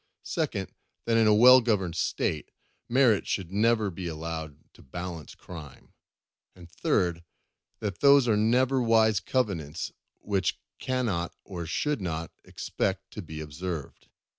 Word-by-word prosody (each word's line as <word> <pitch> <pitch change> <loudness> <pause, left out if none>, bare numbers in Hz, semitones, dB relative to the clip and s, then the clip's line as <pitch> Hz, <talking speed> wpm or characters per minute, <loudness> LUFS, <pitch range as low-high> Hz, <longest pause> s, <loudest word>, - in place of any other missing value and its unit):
Second, - - -2 0.3
that 115 - +2
in 115 -1 +5
a 105 - +6
well 125 +4 +8
governed 100 -7 0
State, 75 -2 -1 0.4
merit 120 -4 +3
should 95 -3 -2
never 110 0 +2
be 90 0 -6
allowed 80 -2 -6
to - - -17
balance 85 +2 -7
crime. 80 -6 -11 0.6
And 85 -2 -14
third, 85 -1 0 0.6
that 100 -5 -3
those 140 -2 +6
are 110 - +4
never 125 +5 +3
wise 110 -3 +4
covenants 90 - -2 0.3
which 95 -3 0
we - - -17
cannot 115 -10 -1
or 85 -4 -6
should 150 - -1
not 85 -2 -3
expect - - -3
to - - -6
be 80 -1 -7
observed. 75 +1 -6
95 Hz, 140 wpm, -28 LUFS, 85-115 Hz, 0.6 s, well